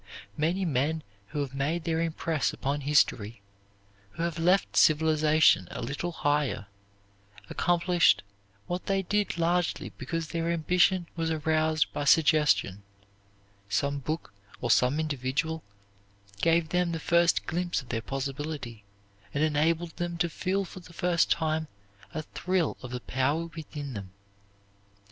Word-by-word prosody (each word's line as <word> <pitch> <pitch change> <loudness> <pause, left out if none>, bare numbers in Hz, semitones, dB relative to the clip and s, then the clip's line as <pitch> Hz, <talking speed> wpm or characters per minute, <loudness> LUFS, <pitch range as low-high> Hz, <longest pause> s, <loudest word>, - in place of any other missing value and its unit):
Many 175 +5 0
men 155 +1 0 0.2
who 145 +8 -3
have 135 -2 -4
made 150 +5 -1
their 165 0 0
impress 165 -2 0
upon 140 +2 -2
history, 115 -7 +1 0.7
who 165 - -3
have 170 -1 -2
left 180 +4 +2
civilization 155 - +4
a - - -6
little 145 +8 -3
higher, 145 -9 0 0.9
accomplished 175 0 +3 0.4
what 175 +1 -4
they 195 -1 +1
did 205 +1 0
largely 175 +1 0
because 165 -2 -3
their 165 0 -1
ambition 175 +2 +2
was 165 -1 -1
aroused 155 0 +1
by 145 -1 -2
suggestion; 150 - +4 0.9
some 140 +7 0
book 155 -4 -4 0.3
or 120 - 0
some 125 +6 +3
individual 155 +2 -2 0.8
gave 165 -1 +3
them 180 -1 +1
the 165 - -2
first 170 +1 +3
glimpse 175 +1 -1
of 125 - -18
their 115 -2 -1
possibility 135 -2 -5 0.5
and 145 - +2
enabled 160 +2 +1
them 175 -1 -3
to 170 +1 +1
feel 190 +4 -1
for 185 - -10
the 175 -1 -15
first 175 0 +2
time 160 -1 0 0.4
a 155 - -4
thrill 180 +1 -1
of 125 - -7
the 125 0 -5
power 140 +7 0
within 145 -3 -6
them. 100 -4 -6
160 Hz, 135 wpm, -28 LUFS, 145-170 Hz, 0.9 s, civilization